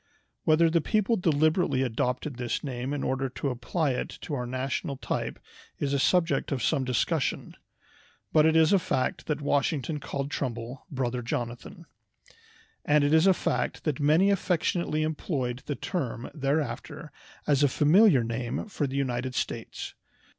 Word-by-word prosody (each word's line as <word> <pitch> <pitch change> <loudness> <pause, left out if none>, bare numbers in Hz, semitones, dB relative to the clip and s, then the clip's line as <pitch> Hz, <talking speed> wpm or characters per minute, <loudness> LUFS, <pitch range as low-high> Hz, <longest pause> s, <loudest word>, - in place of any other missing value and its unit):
Whether 160 +2 +5
the 165 0 +2
people 215 +6 +1
deliberately 155 -5 +2
adopted 125 +2 -2
this 120 -2 -2
name 130 -1 -4
in 145 -1 -2
order 135 0 -1
to 135 +2 -3
apply 135 +5 -1
it 125 - -2
to 155 - -6
our 125 -3 -2
national 130 +2 -3
type - - -3 0.4
is 140 -1 -1
a 140 - +2
subject 175 +3 +2
of 130 -5 -1
some 140 0 +2
discussion; 125 -2 -1 0.8
but 155 - +6
it 160 0 +4
is 160 +3 +5
a 195 - +5
fact 130 -6 -1
that 150 -1 -1
Washington 145 +1 0
called 140 0 -4
Trumbull 125 +1 -4
"Brother 125 -4 -2
Jonathan," 120 0 -5 1.0
and 150 0 +3
it 145 +1 +2
is 160 +4 +5
a 190 - +7
fact - - -1
that 150 -4 -1
many 155 +7 +4
affectionately 170 -4 0
employed 140 -5 -2
the 145 - -1
term 130 -10 -4
thereafter 145 +1 -2 0.3
as 145 -2 +3
a 145 - +6
familiar 150 - +5
name 115 +1 -3
for 150 -7 -1
the 135 +1 -4
United 130 -1 -1
States. - - -4
145 Hz, 155 wpm, -28 LUFS, 130-160 Hz, 1.0 s, a